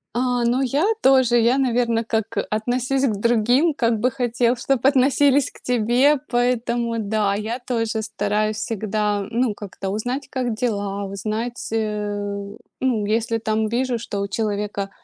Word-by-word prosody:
А, 245 0 +1
ну 250 +3 +2
я 275 +7 +1 0.2
тоже. 260 -3 +5
Я, 235 +3 +3
наверно, 240 -3 +1
как, 225 -1 -2
э, - - +3
"относись 250 +5 0
к 220 - 0
другим, 240 +8 +3
как 230 -5 +1
бы 250 +3 +1
хотел, 240 -1 +1
чтоб 260 +1 -1
относились 275 0 +4
к - - -18
тебе", 250 +5 +3
поэтому, 240 -1 0
да, 210 -1 0
я 220 +4 -3
тоже 225 -3 -2
стараюсь 215 0 -1
всегда, 210 -2 -1
ну, 235 -2 0
как-то 195 -1 -6
узнать, 245 +7 -3
как 250 -4 -2
дела, 205 -4 -2
узнать, 215 +5 -4
э, 205 -2 -2 0.3
ну, 240 -6 0
если 225 +1 0
там 220 0 0
вижу, 245 +1 0
что 205 -3 -5
у 200 - -1
человека 205 -1 -2
230 Hz, 150 wpm, -22 LUFS, 210-250 Hz, 0.3 s, тоже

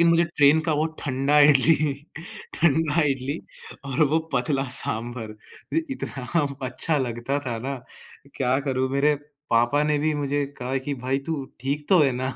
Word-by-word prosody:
लेकिन 170 - +5
मुझे 170 +1 +4
ट्रेन 145 +2 +5
का - - +3
वो 155 - +2
ठंडा 140 +2 +1
इडली 150 +1 +5 0.6
ठंडा 160 0 +2
इडली 135 +3 -2 0.5
और 140 +3 +1
वो 160 - +4 0.2
पतला 135 +2 0
सांभर 115 -1 -2 0.4
इ 325 - +2
इतना 145 - -2 0.2
अच्छा 145 +5 +1
लगता 120 +2 -2
था 115 -2 -2
ना 140 0 -2 0.6
क्या 130 0 +1
करूँ, 130 -2 -1
मेरे 145 +2 +3 0.4
पापा 120 +6 +3
ने 150 - +2
भी 155 +1 0
मुझे 145 0 -1
कहा 125 +2 -2
कि 145 - -1
भाई 135 +1 +1
तू 150 -4 -2 0.2
ठीक 145 +3 -3
तो 185 - +6
है 135 -3 +3
ना? 130 +1 -2
140 Hz, 165 wpm, -24 LUFS, 130-150 Hz, 0.6 s, तो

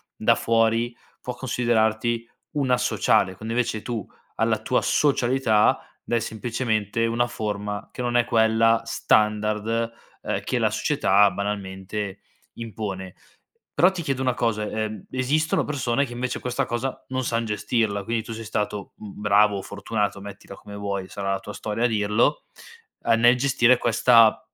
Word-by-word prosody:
da - - +3
fuori 115 +1 +1 0.3
può 125 - -5
considerarti 115 -2 0 0.2
un 140 -4 -1
asociale, 95 -6 +2
quando 110 +4 -5
invece 115 -3 -1
tu 115 -4 -4 0.3
alla - - +1
tua - - +1
socialità 130 -6 +2 0.2
dai 120 - 0
semplicemente 115 -1 -1
una 120 +1 +1
forma, 105 -3 -4
che - - -6
non 120 0 +1
è 120 - +3
quella 115 0 +3
standard, 110 +1 +1 0.3
ehm, - - -2
che - - -1
la - - +2
società 100 +1 +3
banalmente 100 0 -4 0.3
impone. 100 -5 -6 0.6
Però 180 - +5
ti 185 -2 -5
chiedo 135 -4 -2
una 130 -1 +1
cosa: 115 -3 -1
ehm, 110 -2 -4
esistono 145 +5 +1
persone 135 -2 0
che 120 - -9
invece 125 +1 -3
questa 125 +2 -2
cosa 125 +2 -4
non 130 0 -2
san 115 -1 -1
gestirla, 105 -1 -1
quindi 115 +2 -2
tu 115 - -7
sei 115 0 -7
stato, 105 -2 -3
mhmm, 105 -1 -10
bravo 105 0 +4
o - - -4
fortunato, 100 0 -3
mettila 100 0 -10
come 100 +1 -11
vuoi 100 -2 -3
sarà 100 -1 -3
la 95 - -2
tua 105 +1 -9
storia 105 +3 -3
a - - +5
dirlo, 110 +6 +1 0.6
a 115 - +4
nel 120 +2 +5
gestire 125 -2 +4
questa 115 -1 +5
115 Hz, 155 wpm, -24 LUFS, 105-120 Hz, 0.6 s, Però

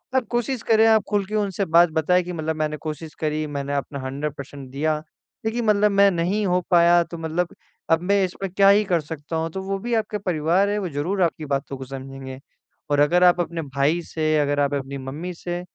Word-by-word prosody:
आप 260 -2 +2
कोशिश 240 +1 -1
करें 220 0 +4
आप 220 -2 +5
खुल 205 -1 +1
के 210 +3 -5
उनसे 200 -2 0
बात 170 0 +5
बताएँ 180 +3 +2
कि 180 +1 -6
मतलब 160 -1 -2
मैंने 155 -1 -1
कोशिश 155 +1 -6
करी 155 0 -1
मैंने 140 -1 -4
अपना 140 0 -3
100% 140 0 -6
दिया 155 +3 0 0.5
लेकिन 230 +1 -1
मतलब 210 -1 +3
मैं 200 0 +5
नहीं 185 +5 0
हो 180 0 +2
पाया 175 0 +6
तो 170 0 -9
मतलब 165 +2 -2 0.4
अब 165 0 +4
मैं 200 +1 +2
इसमें 190 +1 -5
क्या 195 +1 +5
ही 205 +1 +5
कर 175 -4 +1
सकता 150 +1 -7
हूँ? 160 0 -1
तो 190 - -5
वो 195 +1 -2
भी 240 +4 -3
आपके 215 -1 -1
परिवार 180 +1 +1
है 205 - 0
वो 190 -3 -3
ज़रूर 165 +7 -2
आपकी 160 -2 -1
बातों 140 0 -2
को 130 - -7
समझेंगे। 135 0 -8 0.5
और 145 - +3
अगर 175 +5 +4
आप 180 0 +5
अपने 170 0 -3
भाई 140 +3 0
से, 155 -1 0
अगर 145 0 +1
आप 145 0 +1
अपनी 140 0 -3
मम्मी 145 +7 -6
से 175 +1 -5
170 Hz, 215 wpm, -23 LUFS, 145-195 Hz, 0.5 s, पाया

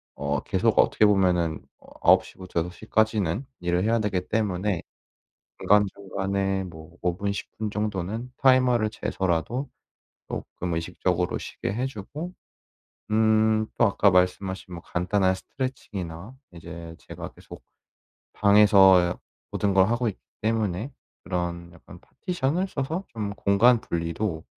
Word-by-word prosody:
어 70 +1 -1
계속 - - +1
어떻게 110 - +4
보면은 90 -5 +2 0.2
어 - - -21
9 - - +6
시부터 90 -3 -4
6 90 +1 -5
시까지는 110 - 0
일을 90 +1 0
해야 115 +1 +2
되기 100 -4 -1
때문에 100 -4 0 0.8
중간중간에 95 -1 +1
뭐 85 -1 -12
5 90 -1 0
분 100 0 -1
10 - - -6
분 110 -1 -2
정도는 105 +3 -3
타이머를 125 -4 +4
재서라도 100 - -2 0.6
쪼끔 85 -2 -4
의식적으로 90 +1 -1
쉬게 - - -5
해 125 +5 -1
주고 145 - -7 0.8
음 110 0 +4 0.3
또 - - +5
아까 100 -1 +3
말씀하신 90 0 0
뭐 85 - -8
간단한 95 +2 +1
스트레칭이나 100 -4 -6 0.2
이제 85 -1 -9
제가 - - -8
계속 - - -13 0.7
방에서 100 -2 +7
야 90 0 -1 0.3
모든 100 -1 0
걸 95 +1 +5
하고 120 0 +1
있기 100 - -6 0.2
때문에 110 +2 -1 0.3
그런 85 -1 -3
약간 85 - -14
파티션을 175 +2 -2
써서 160 +5 -3
좀 105 -3 -4
공간 115 +5 +4
분리도 85 -1 -3
100 Hz, 270 characters per minute, -25 LUFS, 90-110 Hz, 0.8 s, 방에서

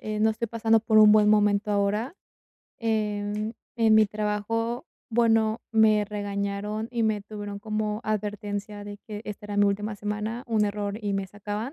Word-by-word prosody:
eh, 215 0 -4
no 220 +1 +4
estoy 225 +1 -3
pasando 225 0 +2
por 220 0 +3
un 215 -1 +8
buen 210 -1 +5
momento 210 0 +3
ahora, 205 - 0 0.6
em, 210 -1 -1 0.2
en 225 -2 +4
mi 215 0 +7
trabajo, 215 +3 -2 0.2
bueno, 225 -1 +2
me 220 -2 +4
regañaron 205 +1 -3
y 235 -2 0
me 215 -1 +1
tuvieron 205 -1 -7
como 215 0 -2
advertencia 210 -1 -3
de 205 0 -8
que 210 -1 -6
esta 210 0 -7
era 205 0 -4
mi 205 - +5
última 205 +1 0
semana. 210 +3 -4
Un 220 -2 +2
error 205 0 -3
y 205 -2 -2
me 195 -1 -1
sacaban, 210 +5 -5
210 Hz, 170 wpm, -26 LUFS, 205-220 Hz, 0.6 s, un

